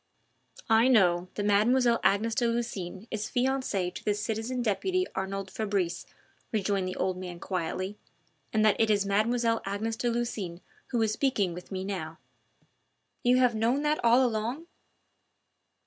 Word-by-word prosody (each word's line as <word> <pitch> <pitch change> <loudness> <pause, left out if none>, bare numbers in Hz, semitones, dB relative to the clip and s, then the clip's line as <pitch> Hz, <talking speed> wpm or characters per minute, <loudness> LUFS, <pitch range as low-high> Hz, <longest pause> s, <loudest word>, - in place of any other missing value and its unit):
"I 225 +2 +6
know 180 -8 +4
that 205 - -2
Mademoiselle 235 +4 +3
Agnes 215 +3 +2
de 240 - +1
Lucines 215 -5 -3
is 215 -1 -3
fiancee 250 -8 0
to - - -9
the 210 - +1
citizen 225 +4 -2
deputy 370 - 0
Arnould 195 0 -4
Fabrice," 200 -5 -2 0.4
rejoined 200 -3 0
the 185 - -4
old 185 -1 -1
man 180 -2 -7
quietly, 185 +3 -3 0.5
"and 220 0 +2
that 215 - +3
it 225 - +3
is 205 -2 +2
Mademoiselle 230 +3 +1
Agnes 210 +3 -2
de 240 +1 -1
Lucines 220 -7 -3 0.3
who 240 - -1
is 220 - +1
speaking 215 -9 +1
with 180 +3 -10
me 190 0 -3
now." 165 -5 -4 1.0
"You 250 0 +4
have 250 -2 +4
known 235 +6 +1
that 300 -2 0
all 240 +2 +5
along?" 235 +7 -2
215 Hz, 150 wpm, -28 LUFS, 190-240 Hz, 1.0 s, I